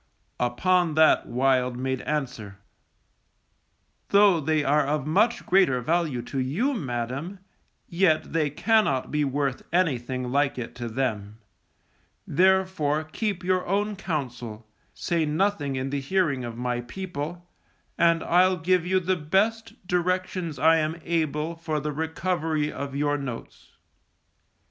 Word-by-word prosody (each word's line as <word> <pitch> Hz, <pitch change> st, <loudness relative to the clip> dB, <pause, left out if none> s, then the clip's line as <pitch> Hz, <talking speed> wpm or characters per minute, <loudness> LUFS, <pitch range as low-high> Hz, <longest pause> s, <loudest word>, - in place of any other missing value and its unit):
Upon 165 Hz, +7 st, +1 dB
that 155 Hz, 0 st, +4 dB
Wild 125 Hz, 0 st, +1 dB
made 130 Hz, 0 st, -2 dB
answer, 125 Hz, -9 st, -4 dB, 1.5 s
_Though 200 Hz, -5 st, +5 dB
they 155 Hz, 0 st, +1 dB
are 145 Hz, +2 st, +3 dB
of 145 Hz, 0 st, -1 dB
much 205 Hz, +10 st, +2 dB
greater 180 Hz, -9 st, +3 dB
value 150 Hz, -2 st, 0 dB
to 135 Hz, +2 st, -4 dB
you, 175 Hz, -, 0 dB
madam, 135 Hz, -, -4 dB, 0.5 s
yet 170 Hz, -4 st, +1 dB
they 155 Hz, -3 st, +1 dB
cannot 150 Hz, -, +1 dB
be 150 Hz, 0 st, +1 dB
worth 140 Hz, -1 st, -1 dB
anything 130 Hz, -7 st, 0 dB
like 140 Hz, 0 st, +1 dB
it 120 Hz, -2 st, -5 dB
to 120 Hz, -1 st, -4 dB
them; 110 Hz, -4 st, -3 dB, 0.9 s
therefore 185 Hz, -4 st, +2 dB
keep 185 Hz, +4 st, -3 dB
your 185 Hz, 0 st, +1 dB
own 205 Hz, +3 st, 0 dB
counsel, 125 Hz, -, -5 dB, 0.3 s
say 170 Hz, -3 st, -1 dB
nothing 155 Hz, -2 st, 0 dB
in 130 Hz, +1 st, -3 dB
the 140 Hz, -1 st, -2 dB
hearing 140 Hz, -4 st, 0 dB
of 115 Hz, -1 st, -6 dB
my 125 Hz, 0 st, -2 dB
people, 175 Hz, +3 st, -6 dB, 0.5 s
and 170 Hz, -1 st, +3 dB
I'll 185 Hz, +2 st, +3 dB
give 180 Hz, +1 st, +2 dB
you 185 Hz, +1 st, +3 dB
the 185 Hz, +1 st, 0 dB
best, 215 Hz, +7 st, -1 dB
directions 180 Hz, -2 st, -1 dB
I 160 Hz, +1 st, +5 dB
am 160 Hz, +1 st, -1 dB
able 160 Hz, -1 st, -1 dB
for 160 Hz, -2 st, -2 dB
the 150 Hz, +1 st, -3 dB
recovery 160 Hz, 0 st, -1 dB
of 140 Hz, -1 st, -5 dB
your 145 Hz, 0 st, 0 dB
notes. 125 Hz, -4 st, -8 dB
155 Hz, 130 wpm, -25 LUFS, 135-180 Hz, 1.5 s, Though